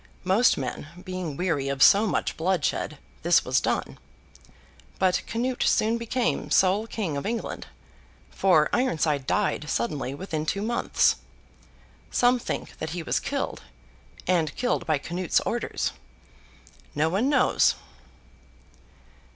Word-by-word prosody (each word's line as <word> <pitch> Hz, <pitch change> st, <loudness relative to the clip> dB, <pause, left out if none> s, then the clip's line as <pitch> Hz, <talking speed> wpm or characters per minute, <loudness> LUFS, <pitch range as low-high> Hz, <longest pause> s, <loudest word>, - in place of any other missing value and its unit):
Most 195 Hz, +7 st, +4 dB
men 130 Hz, +2 st, -4 dB, 0.2 s
being 185 Hz, -6 st, -5 dB
weary 160 Hz, -7 st, 0 dB
of 140 Hz, -1 st, +2 dB
so 210 Hz, +3 st, +6 dB
much -, -, -1 dB
bloodshed, 180 Hz, +2 st, -1 dB, 0.2 s
this -, -, +3 dB
was -, -, +2 dB
done. -, -, -2 dB, 1.0 s
But 185 Hz, -1 st, +2 dB
Canute 245 Hz, +3 st, -2 dB
soon 225 Hz, +2 st, +2 dB
became 235 Hz, +1 st, -1 dB
sole 195 Hz, +4 st, +3 dB
King 190 Hz, -11 st, -3 dB
of 140 Hz, -, -4 dB
England; 230 Hz, +1 st, -4 dB, 0.6 s
for 170 Hz, -6 st, +4 dB
Ironside 155 Hz, -, +1 dB
died 150 Hz, -, 0 dB
suddenly 135 Hz, +2 st, -2 dB
within 160 Hz, -2 st, -4 dB
two 200 Hz, +4 st, -1 dB
months. 235 Hz, +2 st, +2 dB, 0.9 s
Some 245 Hz, 0 st, +3 dB
think -, -, -5 dB
that 160 Hz, -, -3 dB
he 170 Hz, -, -3 dB
was -, -, 0 dB
killed, -, -, -3 dB, 0.6 s
and 165 Hz, -4 st, +1 dB
killed 245 Hz, -8 st, -1 dB
by 155 Hz, -2 st, +2 dB
Canute's 175 Hz, +4 st, 0 dB
orders. -, -, -2 dB, 1.0 s
No 150 Hz, +2 st, +2 dB
one 200 Hz, +11 st, +1 dB
knows. 275 Hz, -3 st, +3 dB
185 Hz, 125 wpm, -26 LUFS, 155-225 Hz, 1.0 s, so